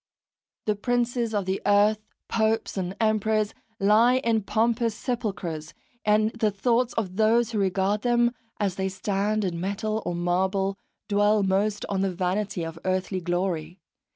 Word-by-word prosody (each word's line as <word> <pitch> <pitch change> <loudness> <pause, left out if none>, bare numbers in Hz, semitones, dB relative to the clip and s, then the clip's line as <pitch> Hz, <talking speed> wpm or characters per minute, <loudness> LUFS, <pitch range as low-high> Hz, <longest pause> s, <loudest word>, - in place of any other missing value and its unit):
The 210 - +1
princes 240 +1 0
of 205 -3 -1
the 190 +1 -1
earth, 205 +1 +4 0.3
popes 220 0 0
and 185 -1 -3
emperors, 215 -1 +1 0.3
lie 220 +5 +5
in 230 -3 +1
pompous 230 +2 +1
sepulchres, 180 - -4 0.3
and 215 +1 +3
the 225 -2 +1
thoughts 235 +4 +1
of 190 -4 -2
those 230 +1 +3
who 215 - -1
regard 195 +2 +1
them, 240 0 +2 0.3
as 195 -3 -1
they 190 0 0
stand 200 +2 -1
in 170 -2 -3
metal 215 +3 -2
or 175 - -2
marble, 190 +3 0 0.3
dwell 205 0 +3
most 200 +2 0
on 195 -1 -1
the 195 -1 +1
vanity 185 +1 -1
of 165 0 -7
earthly 185 0 -1
glory. 175 0 -2
205 Hz, 150 wpm, -26 LUFS, 190-220 Hz, 0.3 s, lie